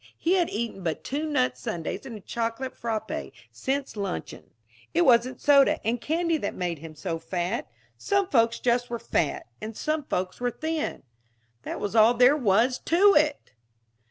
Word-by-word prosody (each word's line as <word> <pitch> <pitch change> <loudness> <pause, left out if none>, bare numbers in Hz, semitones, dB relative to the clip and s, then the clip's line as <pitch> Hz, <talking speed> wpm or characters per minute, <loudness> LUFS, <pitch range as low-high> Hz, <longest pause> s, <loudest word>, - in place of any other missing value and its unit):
He 340 - +1
had 355 -3 +2
eaten 225 -3 -4
but 165 -3 -3
two 295 +4 -2
nut 125 - 0
sundaes 165 - -4
and 230 -4 -7
a - - -12
chocolate 230 +5 -3
frappé 220 -2 -4 0.2
since 275 -2 -3
luncheon. 200 - -5 0.5
It 175 - +5
wasn't 245 +1 +4
soda 280 -2 +5
and 235 +2 0
candy 335 +1 0
that 205 - -4
made 175 -3 -3
him 160 0 -10
so 165 +2 -4
fat. 180 +6 -3 0.3
Some 395 -2 +1
folks 230 -6 +2
just 245 0 +1
were 235 - -2
fat, 165 -8 -1 0.2
and 220 0 -6
some 310 -1 -1
folks 185 -4 -3
were 245 0 0
thin. 315 +4 -3 0.6
That - - -5
was 205 +2 -3
all 225 +2 +6
there 250 +4 +6
was 240 0 +2
to 395 +5 +5
it! 300 -1 +1
235 Hz, 170 wpm, -26 LUFS, 200-290 Hz, 0.6 s, all